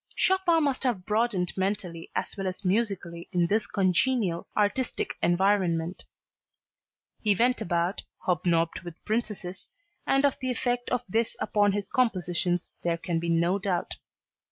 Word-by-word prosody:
Chopin 370 Hz, -4 st, +3 dB
must 275 Hz, -3 st, 0 dB
have 235 Hz, -9 st, -1 dB
broadened 210 Hz, -5 st, +1 dB
mentally 185 Hz, -4 st, -2 dB
as -, -, -2 dB
well 195 Hz, -2 st, -3 dB
as 185 Hz, +2 st, -5 dB
musically 185 Hz, -4 st, -1 dB
in 175 Hz, -2 st, +2 dB
this 210 Hz, +5 st, +1 dB
congenial, 190 Hz, -1 st, +1 dB
artistic 215 Hz, +5 st, 0 dB
environment. 175 Hz, -1 st, +1 dB, 1.2 s
He 210 Hz, -2 st, +3 dB
went 245 Hz, +4 st, +2 dB
about, 170 Hz, +3 st, 0 dB, 0.2 s
hobnobbed 170 Hz, -1 st, +1 dB
with 175 Hz, -2 st, -11 dB
princesses, 210 Hz, -5 st, -3 dB, 0.4 s
and 275 Hz, +1 st, +4 dB
of 280 Hz, -, +1 dB
the 260 Hz, -, -2 dB
effect 245 Hz, 0 st, -1 dB
of 250 Hz, -1 st, 0 dB
this 225 Hz, +4 st, 0 dB
upon 205 Hz, -1 st, +2 dB
his 200 Hz, -1 st, -2 dB
compositions 180 Hz, -7 st, 0 dB
there 170 Hz, -1 st, 0 dB
can 170 Hz, 0 st, -2 dB
be 170 Hz, 0 st, -2 dB
no 170 Hz, +4 st, +2 dB
doubt. 185 Hz, -3 st, -2 dB
195 Hz, 140 wpm, -28 LUFS, 175-230 Hz, 1.2 s, and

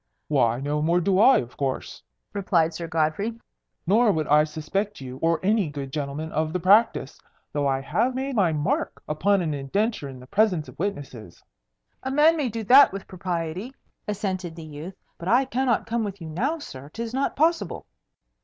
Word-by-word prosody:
"Why 120 Hz, -5 st, +2 dB
no 145 Hz, +2 st, -1 dB
more 170 Hz, +3 st, +3 dB
do 190 Hz, +2 st, +2 dB
I, 255 Hz, +5 st, +7 dB
of 120 Hz, 0 st, -4 dB
course," 135 Hz, -2 st, -3 dB, 0.3 s
replied 170 Hz, -5 st, +1 dB
Sir 170 Hz, +1 st, -5 dB
Godfrey; 165 Hz, +8 st, -1 dB, 0.5 s
"nor 215 Hz, +5 st, +4 dB
would 155 Hz, -4 st, -1 dB
I 150 Hz, +1 st, +5 dB
suspect 160 Hz, +7 st, -3 dB
you 130 Hz, -1 st, -8 dB
or 165 Hz, +2 st, +1 dB
any 205 Hz, -3 st, +2 dB
good 140 Hz, -2 st, -6 dB
gentleman 150 Hz, +1 st, -4 dB
of 155 Hz, +1 st, -1 dB
the 180 Hz, -, 0 dB
practice, 185 Hz, -, +3 dB, 0.3 s
though 145 Hz, -1 st, 0 dB
I 135 Hz, -1 st, 0 dB
have 180 Hz, -, 0 dB
made 265 Hz, 0 st, -2 dB
my 190 Hz, -6 st, +3 dB
mark 150 Hz, -1 st, -1 dB
upon 185 Hz, +5 st, +2 dB
an 155 Hz, -3 st, -1 dB
indenture 145 Hz, -, -1 dB
in 130 Hz, -1 st, -10 dB
the 125 Hz, -, -12 dB
presence 185 Hz, -1 st, +1 dB
of -, -, -14 dB
witnesses." 140 Hz, -, -5 dB, 0.6 s
"A 265 Hz, -, -4 dB
man 300 Hz, +4 st, +5 dB
may 290 Hz, -6 st, -1 dB
do 225 Hz, 0 st, -4 dB
that 260 Hz, +7 st, +7 dB
with 195 Hz, 0 st, -7 dB
propriety," 180 Hz, +5 st, -4 dB, 0.3 s
assented 190 Hz, -5 st, -3 dB
the 165 Hz, -2 st, -9 dB
youth. 155 Hz, +5 st, -8 dB, 0.2 s
"But 170 Hz, -, -7 dB
I 245 Hz, +6 st, +4 dB
cannot 255 Hz, -3 st, 0 dB
come 230 Hz, 0 st, -1 dB
with 200 Hz, -2 st, -5 dB
you 165 Hz, -2 st, -7 dB
now, 270 Hz, -, -1 dB
sir. 140 Hz, -, -10 dB
'Tis 230 Hz, +7 st, -6 dB
not 270 Hz, +2 st, 0 dB
possible." 330 Hz, +3 st, +1 dB
175 Hz, 185 wpm, -25 LUFS, 150-220 Hz, 0.6 s, I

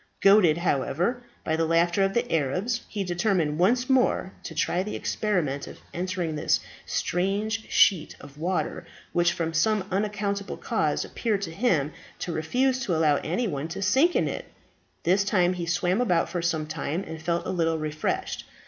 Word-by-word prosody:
Goaded, 195 Hz, -6 st, +6 dB
however, 175 Hz, -, 0 dB, 0.2 s
by 160 Hz, -, 0 dB
the 165 Hz, 0 st, +1 dB
laughter 170 Hz, +3 st, +3 dB
of 195 Hz, 0 st, 0 dB
the 240 Hz, -3 st, 0 dB
Arabs, 185 Hz, -, 0 dB
he 205 Hz, -2 st, -2 dB
determined 175 Hz, -4 st, 0 dB
once 245 Hz, +7 st, +3 dB
more 255 Hz, -7 st, +2 dB
to -, -, -8 dB
try 180 Hz, -, +1 dB
the 210 Hz, +3 st, -4 dB
experiment 165 Hz, -10 st, -1 dB
of -, -, -10 dB, 0.2 s
entering 180 Hz, -2 st, -2 dB
this 150 Hz, -, +2 dB, 0.3 s
strange 205 Hz, +5 st, -1 dB
sheet 180 Hz, -6 st, +4 dB
of 140 Hz, -1 st, -13 dB
water, 180 Hz, +3 st, -1 dB, 0.3 s
which 175 Hz, 0 st, +3 dB
from 165 Hz, -1 st, -2 dB
some 200 Hz, +4 st, +2 dB
unaccountable 200 Hz, 0 st, -2 dB
cause -, -, 0 dB
appeared 210 Hz, -4 st, -1 dB
to 165 Hz, -, -4 dB
him 165 Hz, -, +1 dB, 0.3 s
to 175 Hz, -, -4 dB
refuse 255 Hz, +12 st, +1 dB
to 205 Hz, -10 st, -1 dB
allow 155 Hz, -2 st, +3 dB
anybody 160 Hz, -, -2 dB
to 175 Hz, +4 st, -4 dB
sink 270 Hz, -, +3 dB
in -, -, +2 dB
it. -, -, -4 dB, 0.6 s
This 190 Hz, +3 st, +3 dB
time 185 Hz, -3 st, +2 dB
he 175 Hz, -2 st, -4 dB
swam 180 Hz, +4 st, +1 dB
about 180 Hz, -9 st, +2 dB
for 175 Hz, -, -2 dB
some 165 Hz, -2 st, 0 dB
time, 160 Hz, +3 st, -3 dB
and 160 Hz, 0 st, -7 dB
felt 170 Hz, +1 st, -1 dB
a -, -, -2 dB
little 165 Hz, -3 st, +1 dB
refreshed. 155 Hz, 0 st, -3 dB
180 Hz, 170 wpm, -26 LUFS, 160-205 Hz, 0.6 s, Goaded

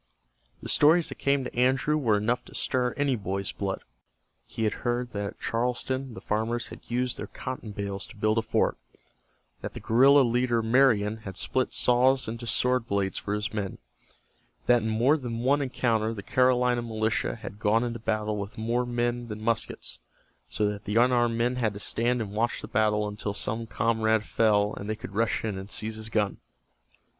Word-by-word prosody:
The -, -, -5 dB
stories 160 Hz, +3 st, +5 dB
that -, -, -8 dB
came 140 Hz, -1 st, +2 dB
to 125 Hz, -, -7 dB
Andrew 130 Hz, +4 st, +2 dB
were 115 Hz, -9 st, +2 dB
enough 115 Hz, +4 st, 0 dB
to -, -, -13 dB
stir 125 Hz, -1 st, 0 dB
any 140 Hz, -2 st, +1 dB
boy's 100 Hz, -3 st, -3 dB
blood. 95 Hz, -1 st, -4 dB, 0.6 s
He 115 Hz, -, -4 dB
had 110 Hz, -, +1 dB
heard 120 Hz, 0 st, -1 dB
that 100 Hz, 0 st, -2 dB
at -, -, -9 dB
Charleston 125 Hz, +2 st, -2 dB
the -, -, -8 dB
farmers 110 Hz, +3 st, -1 dB
had -, -, -12 dB
used 125 Hz, +1 st, -1 dB
their -, -, -5 dB
cotton 125 Hz, -4 st, -6 dB
bales 100 Hz, -1 st, -4 dB
to -, -, -14 dB
build 110 Hz, +2 st, +1 dB
a -, -, +1 dB
fort, 110 Hz, -, 0 dB, 0.8 s
that -, -, -6 dB
the -, -, -5 dB
guerrilla 135 Hz, +5 st, +5 dB
leader 120 Hz, -1 st, +1 dB
Marion 110 Hz, -3 st, +3 dB
had 95 Hz, -4 st, -9 dB
split 130 Hz, -1 st, 0 dB
saws 130 Hz, +1 st, +4 dB
into 115 Hz, +1 st, -5 dB
sword 125 Hz, 0 st, +2 dB
blades 100 Hz, -2 st, 0 dB
for 105 Hz, -, -2 dB
his 105 Hz, +3 st, -3 dB
men, 100 Hz, -3 st, -3 dB, 0.9 s
that 120 Hz, -1 st, +4 dB
in 110 Hz, -, -2 dB
more 120 Hz, +8 st, +3 dB
than 120 Hz, -5 st, -5 dB
one 140 Hz, +4 st, +3 dB
encounter 115 Hz, -4 st, 0 dB
the 100 Hz, -, -7 dB
Carolina 125 Hz, 0 st, +2 dB
militia 110 Hz, -1 st, -1 dB
had 105 Hz, -3 st, -9 dB
gone 110 Hz, +2 st, +2 dB
into 120 Hz, -1 st, -3 dB
battle 110 Hz, -1 st, -1 dB
with 100 Hz, 0 st, -6 dB
more 120 Hz, +3 st, 0 dB
men 120 Hz, 0 st, -1 dB
than 105 Hz, -1 st, -6 dB
muskets, 115 Hz, +1 st, -2 dB, 0.5 s
so 105 Hz, -, 0 dB
that 105 Hz, -1 st, -3 dB
the 105 Hz, -, -2 dB
unarmed 120 Hz, -1 st, +3 dB
men 120 Hz, +2 st, +1 dB
had 110 Hz, -4 st, 0 dB
to -, -, -6 dB
stand 120 Hz, +3 st, 0 dB
and 100 Hz, -, -8 dB
watch 115 Hz, +3 st, -1 dB
the -, -, -5 dB
battle 105 Hz, 0 st, +1 dB
until 105 Hz, 0 st, -4 dB
some 110 Hz, +2 st, -2 dB
comrade 110 Hz, -1 st, +1 dB
fell 105 Hz, -2 st, +2 dB
and 100 Hz, -, -6 dB
they 110 Hz, -, 0 dB
could 110 Hz, -1 st, -9 dB
rush 110 Hz, +2 st, 0 dB
in 100 Hz, -3 st, -3 dB
and 95 Hz, +1 st, -9 dB
seize 110 Hz, +1 st, -2 dB
his 110 Hz, 0 st, -6 dB
gun. 105 Hz, -3 st, 0 dB
115 Hz, 190 wpm, -27 LUFS, 105-125 Hz, 0.9 s, stories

